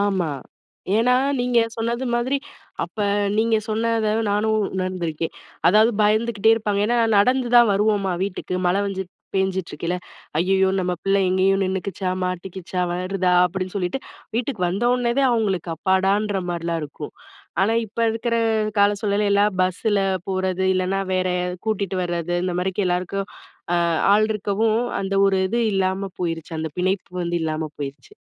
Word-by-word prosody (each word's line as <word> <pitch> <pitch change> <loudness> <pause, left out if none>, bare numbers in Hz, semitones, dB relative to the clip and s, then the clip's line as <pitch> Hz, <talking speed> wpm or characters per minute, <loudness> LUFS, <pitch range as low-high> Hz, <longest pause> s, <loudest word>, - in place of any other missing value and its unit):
ஆமா. 195 -5 +1 0.7
ஏன்னா 245 +3 +4 0.3
நீங்க 245 -1 +2 0.2
சொன்னது 235 +3 -2
மாதிரி, 250 +4 +1 0.5
அப்ப - - -16 0.4
நீங்க 225 0 +3
சொன்னதை 220 0 +1 0.2
நானும் 215 +2 +1 0.2
உணர்ந்துருக்கேன். 175 -4 -2 0.3
அதாவது 215 +6 +6
பயந்துகிட்டே 215 0 +3
இருப்பாங்க. 210 -2 -1
ஏன்னா 240 +1 +1 0.2
நடந்து 250 +3 +3
தான் 240 -2 +7
வருவோமா 200 -2 +1
வீட்டுக்கு, 185 -1 -3
மழை 190 +3 +2
வந்து 190 -1 -3 0.3
பேஞ்சிட்டு 190 -1 0
இருக்கயில. 170 +4 -2 0.4
"ஐயயோ! 190 +2 +3
நம்ம 180 0 -1
பிள்ளை 195 0 +2
எங்கேயும் 190 +1 +2
நின்னுக்கிச்சா? 190 0 -3 0.2
மாட்டிக்கிச்சா? 180 0 -4
வருதா?" 185 +1 -1
அப்படின்னு 185 +2 -3
சொல்லிட்டு, 185 +6 -1 0.4
வீட்டுக்கு 235 -5 -2
வந்த 200 +7 -1
ஒன்னே 240 -1 0
தான் 265 -2 +4
அவங்களுக்கு 195 -7 0
அப்பாடான்ற 195 +2 +1
மாரில்லாம் 170 -1 -2
இருக்கும். 150 0 -7 0.5
ஆனா 220 +3 +2
இப்ப 220 +3 -17
இருக்கிற 230 +1 -2 0.4
கால 200 0 +6
சூழல்ல 205 0 +1
எல்லாம் 200 -1 +3
பஸ்ஸுல 200 +3 +1 0.3
போறது, 190 0 0
இல்லைனா 185 +1 0
வேற 185 0 +1 0.4
கூட்டிட்டு 200 -3 -1
வரது 175 0 -2
இந்த 180 -1 -1
மாதிரி 190 +2 -1
எல்லாருக்கும் 180 +2 -1 0.5
அ - - +3 0.3
ஆள் 215 +1 +4
இருக்கவும், 215 +3 0 0.2
அந்த 195 0 -2
ஒரு 195 -1 +2
இது 235 +3 0
இல்லாம 190 0 0
போயிருச்சு. 165 -2 -3
அந்த 160 -1 -3
பிணைப்பு 185 0 -1
வந்து 170 0 -1
இல்லாம 155 0 -2
போயிருச்சு. 140 - -7
195 Hz, 140 wpm, -22 LUFS, 180-215 Hz, 0.7 s, தான்